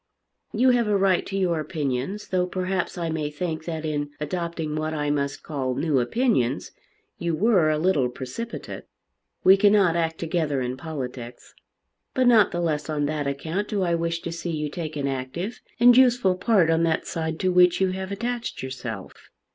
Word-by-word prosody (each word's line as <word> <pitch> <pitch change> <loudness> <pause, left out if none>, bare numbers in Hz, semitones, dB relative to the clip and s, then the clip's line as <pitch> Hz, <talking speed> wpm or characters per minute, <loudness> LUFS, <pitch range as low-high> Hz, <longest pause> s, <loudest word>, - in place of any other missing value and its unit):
You 255 +4 +4
have 240 -2 +2
a 205 -1 +3
right 190 -2 +3
to 195 - -3
your 175 -4 +1
opinions, 150 +6 -3
though 180 -1 +1
perhaps 185 0 -2
I 170 -2 -2
may 155 -2 -2
think 160 +1 -4
that 160 -2 -4
in 145 -1 -2
adopting 165 0 -3
what 155 0 -2
I 145 -1 0
must 140 -1 -2
call 130 -5 -2
new 150 -3 +1
opinions 130 - 0 0.5
you 170 -1 -1
were 190 -3 +3
a 155 - +1
little 155 -6 +2
precipitate. 130 - -7 0.6
We 190 +1 +7
cannot 200 -4 +4
act 165 -1 0
together 160 -4 -1
in 125 0 -2
politics. 130 -5 -7 0.6
But 255 - +3
not 225 -5 +6
the 175 - -2
less 155 -2 -1
on 150 -1 0
that 150 -1 -2
account 160 +9 -2
do 205 -3 -1
I 175 -1 +1
wish 170 0 -1
to 170 - -5
see 170 +1 -5
you 150 -2 -2
take 155 0 -5
an 140 -1 -1
active 135 - -4 0.2
and 240 0 +7
useful 245 -6 +5
part 185 -3 +3
on 165 0 +2
that 165 -1 +1
side 160 -1 -3
to 185 - +2
which 180 -1 +5
you 190 -1 +2
have 190 +1 -5
attached 235 - -3
yourself." 130 0 -7
165 Hz, 185 wpm, -25 LUFS, 150-190 Hz, 0.6 s, We